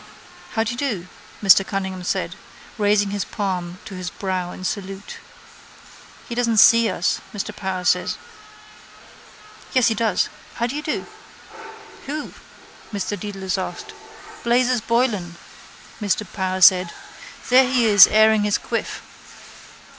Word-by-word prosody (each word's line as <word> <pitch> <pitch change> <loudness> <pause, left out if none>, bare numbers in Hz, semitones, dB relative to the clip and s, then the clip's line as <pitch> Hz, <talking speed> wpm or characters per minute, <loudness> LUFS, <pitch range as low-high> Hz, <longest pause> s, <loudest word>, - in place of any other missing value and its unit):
—How 225 - +1
do 225 - -2
you 240 - -6
do? 215 -11 -2 0.4
Martin 195 0 +7
Cunningham 190 -2 -4
said, - - -2 0.4
raising 205 -1 +2
his 205 -2 -2
palm 180 -4 -4
to 200 - -9
his 185 -1 -5
brow 185 -2 -3
in 185 - -10
salute. 195 +1 -5 1.1
—He - - -5
doesn't 235 -2 0
see 230 +2 +6
us, - - -1
Mr 210 +1 -4
Power 190 -2 -4
said. 180 0 +1 1.6
Yes, 255 -3 +4
he - - +1
does. 220 -3 +1 0.3
How 235 - -1
do 245 +4 -4
you 300 - -3
do? 300 - -3 1.0
—Who? 300 +2 -5 0.6
Mr 200 -2 -3
Dedalus 195 -1 -4
asked. 425 - -6 0.5
—Blazes 245 0 +2
Boylan, 220 -7 0 0.7
Mr 210 +1 0
Power 185 -1 -2
said. 180 -1 +6 0.6
There 255 +1 +6
he 250 -3 +3
is 205 -3 +9
airing 220 0 +4
his 205 0 +1
quiff. - - -4
205 Hz, 130 wpm, -21 LUFS, 190-230 Hz, 1.6 s, is